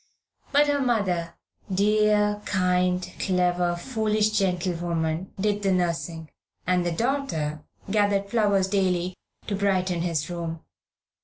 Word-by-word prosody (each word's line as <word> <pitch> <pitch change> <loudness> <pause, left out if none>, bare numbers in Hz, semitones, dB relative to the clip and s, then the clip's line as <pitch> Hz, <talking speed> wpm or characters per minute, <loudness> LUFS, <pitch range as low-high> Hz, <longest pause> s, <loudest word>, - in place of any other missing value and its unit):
But 290 +1 +5
her 290 -1 +1
mother 190 -9 0 0.4
dear, 210 +1 +2
kind, 180 -1 +1
clever, 180 -2 +1
foolish 215 +1 0
gentlewoman 175 -3 -1
did 205 +1 0
the 195 -1 +1
nursing, 170 -3 -1 0.3
and 180 -1 +2
the 175 - -1
daughter 165 - -1 0.2
gathered 200 -1 +1
flowers 200 -3 +2
daily 185 -2 0 0.3
to 205 - -2
brighten 185 -3 +1
his 165 -4 -1
room. 170 -2 -5
185 Hz, 110 wpm, -25 LUFS, 175-210 Hz, 0.4 s, But